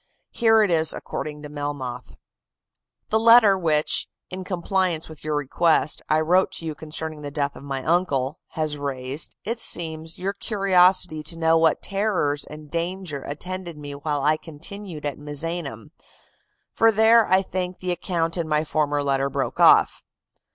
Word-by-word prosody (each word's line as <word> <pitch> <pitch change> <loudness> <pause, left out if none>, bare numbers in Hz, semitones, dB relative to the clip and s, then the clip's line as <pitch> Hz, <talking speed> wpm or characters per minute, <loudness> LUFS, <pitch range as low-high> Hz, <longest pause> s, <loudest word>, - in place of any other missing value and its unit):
Here 225 -2 +4
it 200 - +1
is 160 -1 +3
according 150 -1 -6
to 150 - -7
Melmoth: 145 -4 -5 0.9
"The 220 - +2
letter 225 -3 +7
which, 155 -5 +1 0.2
in 185 +1 -5
compliance 180 -2 -1
with 155 -2 -12
your 155 0 -1
request, 150 +2 +1
I 155 +1 +3
wrote 180 +4 +3
to 170 - -5
you 160 - -3
concerning 155 0 -5
the 145 - -5
death 140 -1 -2
of - - -11
my 135 -2 -4
uncle, 155 -3 0
has 155 -2 -2
raised, 135 +1 -4
it 230 +3 -3
seems, 160 -5 -2
your 195 +2 -2
curiosity 185 -6 +2
to 165 +2 -5
know 165 0 +3
what 160 -1 +2
terrors 195 -8 0
and 150 -1 -11
danger 170 -3 -3
attended 175 +4 -6
me 145 -1 -8
while 145 0 -3
I 155 +2 +3
continued 165 +1 -9
at 145 -1 -3
Misenum: 150 +1 -4 0.8
for 225 0 +4
there, 220 +1 +5
I 190 +1 +4
think, 185 -1 -4
the 185 -1 -3
account 170 -1 -1
in 170 -2 -2
my 150 0 +1
former 145 -2 0
letter 135 0 +1
broke - - -3
off. - - +5
160 Hz, 160 wpm, -23 LUFS, 145-185 Hz, 0.9 s, letter